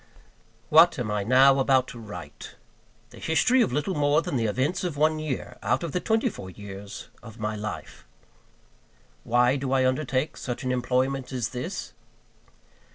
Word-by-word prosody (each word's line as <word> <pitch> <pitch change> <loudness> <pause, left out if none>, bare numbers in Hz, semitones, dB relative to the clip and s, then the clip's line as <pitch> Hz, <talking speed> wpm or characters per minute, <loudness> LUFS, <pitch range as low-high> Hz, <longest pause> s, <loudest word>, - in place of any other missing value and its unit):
WHAT 160 +1 +6
am 115 -5 -2
I 105 -1 -1
now 135 +4 +5
about 130 -1 +3
to 120 - -9
write? 90 -9 -9 0.6
The - - -13
history 180 +11 +3
of 130 - +2
little 150 +8 -1
more 145 0 +2
than 175 -3 -3
the 115 -3 +1
events 140 - -1
of 170 -5 -3
one 155 +1 +2
year, 155 -4 -5
out - - 0
of 170 - -3
the 180 - -1
twenty 220 +6 +1
four 95 - -6
years 100 +1 -9
of 115 -2 -12
my 105 -1 -3
life. 105 0 -7 1.2
Why 125 +3 +3
do 135 -1 -3
I 130 -1 +3
undertake 130 +1 0
such 120 0 -5
an 130 - -1
employment 130 +2 0
as 125 -3 -2
this? 125 0 -5
130 Hz, 165 wpm, -26 LUFS, 115-155 Hz, 1.2 s, WHAT